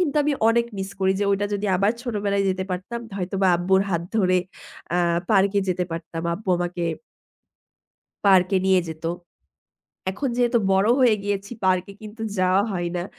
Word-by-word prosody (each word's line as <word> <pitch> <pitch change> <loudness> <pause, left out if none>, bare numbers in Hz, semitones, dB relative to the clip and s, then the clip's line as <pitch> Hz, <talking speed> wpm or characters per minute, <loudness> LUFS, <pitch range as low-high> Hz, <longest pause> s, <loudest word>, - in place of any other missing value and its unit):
কিন্তু 305 -5 0
আমি 295 - +1 0.2
অনেক 235 +1 +3
মিস 190 0 -4
করি। 190 0 +3
যে - - +2
ওইটা 200 +1 +1
যদি 205 +1 -2
আবার 200 +3 +2
ছোটবেলায় 205 -5 -1
যেতে 185 0 -1
পারতাম। 190 +6 -4 0.2
হয়তোবা 190 0 0
আব্বুর 190 +2 +2
হাত 170 -2 0
ধরে 185 -3 +3 0.5
অ্যা 175 - +1 0.3
পার্কে 200 -1 +3
যেতে 180 0 0
পারতাম। 165 0 -5
আব্বু 200 +1 -10
আমাকে 175 0 -3 1.4
পার্কে 190 0 +5
নিয়ে 190 -1 +4
যেত। 160 0 -8 1.1
এখন 270 +8 -3
যেহেতু 240 -1 +3
বড় 195 +3 +3
হয়ে 245 -4 +5
গিয়েছি, 200 +1 -3
পার্কে 185 +1 +1
কিন্তু 215 +1 -9 0.2
যাওয়া 185 +2 +3
হয় 175 -2 -2
না। 175 - -2
190 Hz, 160 wpm, -23 LUFS, 185-210 Hz, 1.4 s, পার্কে